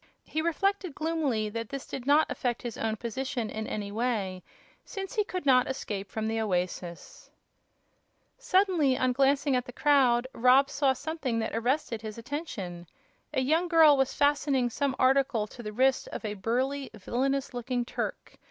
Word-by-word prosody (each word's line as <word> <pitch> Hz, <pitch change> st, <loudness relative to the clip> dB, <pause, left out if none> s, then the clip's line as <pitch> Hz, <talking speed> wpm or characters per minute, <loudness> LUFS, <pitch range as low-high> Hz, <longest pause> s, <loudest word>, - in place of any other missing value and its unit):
He 315 Hz, -, -2 dB
reflected, 365 Hz, 0 st, 0 dB
gloomily, 305 Hz, -9 st, 0 dB
that 230 Hz, +1 st, -5 dB
this 275 Hz, -1 st, -5 dB
did 255 Hz, 0 st, -7 dB
not 295 Hz, +2 st, +5 dB
affect 245 Hz, -2 st, -2 dB
his 240 Hz, -3 st, -4 dB
own 220 Hz, -1 st, -1 dB
position 235 Hz, 0 st, -3 dB
in 220 Hz, 0 st, -4 dB
any 205 Hz, -1 st, -4 dB
way, 205 Hz, -5 st, -1 dB, 0.4 s
since 390 Hz, +1 st, -6 dB
he 430 Hz, -3 st, +2 dB
could 365 Hz, -5 st, -5 dB
not 255 Hz, -2 st, +4 dB
escape 205 Hz, -7 st, -4 dB
from 220 Hz, +2 st, -3 dB
the 225 Hz, 0 st, -1 dB
oasis. 180 Hz, -, -4 dB, 1.1 s
Suddenly, 370 Hz, -, +2 dB
on 255 Hz, -1 st, +2 dB
glancing 275 Hz, +1 st, +2 dB
at 250 Hz, 0 st, 0 dB
the -, -, -8 dB
crowd, 255 Hz, -3 st, +3 dB
Rob 260 Hz, +3 st, +4 dB
saw 275 Hz, -1 st, +2 dB
something 285 Hz, -4 st, -3 dB
that 220 Hz, -1 st, -2 dB
arrested 235 Hz, -1 st, -1 dB
his 215 Hz, -1 st, -7 dB
attention. 225 Hz, -, -6 dB, 0.4 s
A 260 Hz, -, 0 dB
young 320 Hz, +7 st, +2 dB
girl 320 Hz, -3 st, +7 dB
was 270 Hz, -1 st, +1 dB
fastening 285 Hz, -4 st, +2 dB
some 280 Hz, +1 st, -1 dB
article 265 Hz, -4 st, +3 dB
to 240 Hz, -, -11 dB
the 210 Hz, -2 st, -5 dB
wrist 260 Hz, +4 st, +2 dB
of -, -, -6 dB
a 210 Hz, -, -2 dB
burly, 255 Hz, +7 st, -1 dB
villainous 265 Hz, +7 st, -1 dB
looking 245 Hz, 0 st, -2 dB
Turk. -, -, -5 dB
255 Hz, 165 wpm, -28 LUFS, 225-285 Hz, 1.1 s, girl